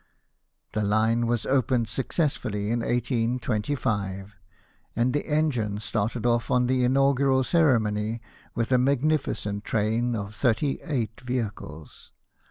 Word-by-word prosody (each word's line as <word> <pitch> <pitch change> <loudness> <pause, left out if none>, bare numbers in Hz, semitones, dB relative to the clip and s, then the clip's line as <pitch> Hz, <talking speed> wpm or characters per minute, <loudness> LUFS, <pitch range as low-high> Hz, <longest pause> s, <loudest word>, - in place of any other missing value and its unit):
The 110 - -1
line 110 +3 +2
was 120 -1 0
opened 130 -3 +1
successfully 120 - -1
in 120 - +1
1825, 115 -4 -1 0.6
and 120 +2 +1
the 145 - -1
engine 135 -10 0
started 110 +3 -2
off 120 -1 +1
on 125 -1 +3
the 130 0 +1
inaugural 135 +1 +3
ceremony 115 -8 +2 0.4
with 115 +1 -1
a 125 - +5
magnificent 135 -6 0
train 115 +3 0
of 105 -1 -5
thirty 125 +4 0
eight 120 -7 -3
vehicles. 110 - -5
120 Hz, 115 wpm, -26 LUFS, 110-130 Hz, 0.6 s, a